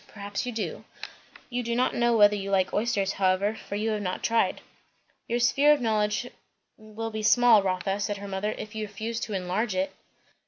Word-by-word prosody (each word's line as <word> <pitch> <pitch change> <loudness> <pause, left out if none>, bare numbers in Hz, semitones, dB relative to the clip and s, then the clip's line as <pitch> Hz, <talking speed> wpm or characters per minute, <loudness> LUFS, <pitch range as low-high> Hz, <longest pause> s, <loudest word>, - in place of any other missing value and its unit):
Perhaps 205 +2 -5
you - - -2
do. 225 -2 -4 0.7
You 245 0 -1
do 235 -1 -2
not 250 +2 +1
know 235 -1 +2
whether 205 -1 +6
you 195 -1 -4
like 190 -2 +1
oysters, 205 -3 0
however, 195 +2 +1
for 200 - -7
you 220 +2 -1
have 210 -1 -2
not 185 -2 -3
tried." 230 0 +1 0.7
"Your 235 - 0
sphere 280 +5 +4
of 295 - 0
knowledge 215 -1 0 0.5
will 220 +1 -7
be 215 0 -4
small, 230 0 +6
Rotha," 195 +1 -1
said 205 0 -2
her 200 0 -8
mother, 195 +2 -2
"if 215 - -7
you 215 -1 -4
refuse 220 +3 -4
to 215 - -5
enlarge 190 +3 -1
it." 190 +1 -1
210 Hz, 195 wpm, -27 LUFS, 195-230 Hz, 0.7 s, whether